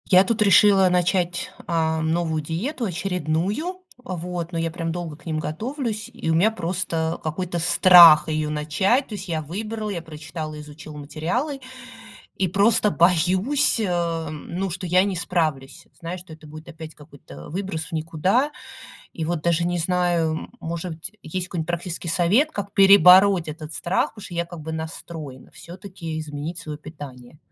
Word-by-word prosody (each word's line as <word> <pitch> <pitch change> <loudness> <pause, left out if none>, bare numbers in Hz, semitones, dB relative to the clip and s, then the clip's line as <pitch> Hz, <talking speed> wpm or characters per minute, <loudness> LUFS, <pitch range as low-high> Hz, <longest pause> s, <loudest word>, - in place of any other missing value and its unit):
Я 185 -1 +7
тут 220 +3 -1
решила 200 -1 +6
начать, 180 0 0 0.2
а, 160 -1 0
новую 160 0 0
диету 220 - -3
очередную. 185 - -2 0.2
Вот. 175 -4 -5
Но 170 - -3
я, 165 0 -1
прям, 165 -1 -3
долго 170 -2 -5
к - - -21
ним 160 -2 -2
готовлюсь, 220 - -4
и 235 -8 -5
у - - +3
меня 175 +7 +4
просто 170 -4 -2
какой-то 170 +2 -3
страх 170 -2 +8
её 155 -1 -1
начать. 165 - +1
То - - -7
есть 195 -1 -7
я 160 -3 -2
выбрала, 215 +7 -5
я 180 -5 -3
прочитала, 155 -1 -7
изучила 150 +1 -11
материалы. 165 - -3 0.8
И 190 - +1
просто 205 +4 +3
боюсь, 185 - +2
эм, 165 -6 -2
ну, 195 +1 -1
что 180 +2 -5
я 185 +2 +4
не 200 -1 -2
справлюсь. 155 -6 -2
Знаешь, 170 +2 -6
что 175 -3 -12
это 155 0 -14
будет 155 +2 -11
опять 160 -1 -10
какой-то, 145 - -15
э, 75 - -10
выброс 180 -2 -4
в - - -15
никуда. 165 - +1 0.6
И 160 - -4
вот 170 -1 -2
даже 170 0 +2
не 175 0 -1
знаю, 175 -1 +1
м, 160 - -5
может 170 +1 -4
быть, 160 +3 -9
есть 180 +3 -4
какой-нибудь 165 -3 -4
практический 175 0 -4
совет, 185 - +3
как 200 -4 -5
перебороть 195 -2 +7
этот 155 0 -8
страх, 175 +5 -1
потому 210 - -10
что - - -10
я 170 0 -1
как 170 -1 -10
бы 160 +1 -6
настроена 160 -4 -8
всё-таки 175 -2 -8
изменить 155 +2 -6
свое 150 -1 -7
питание. 145 -4 -11
170 Hz, 170 wpm, -23 LUFS, 160-190 Hz, 0.8 s, страх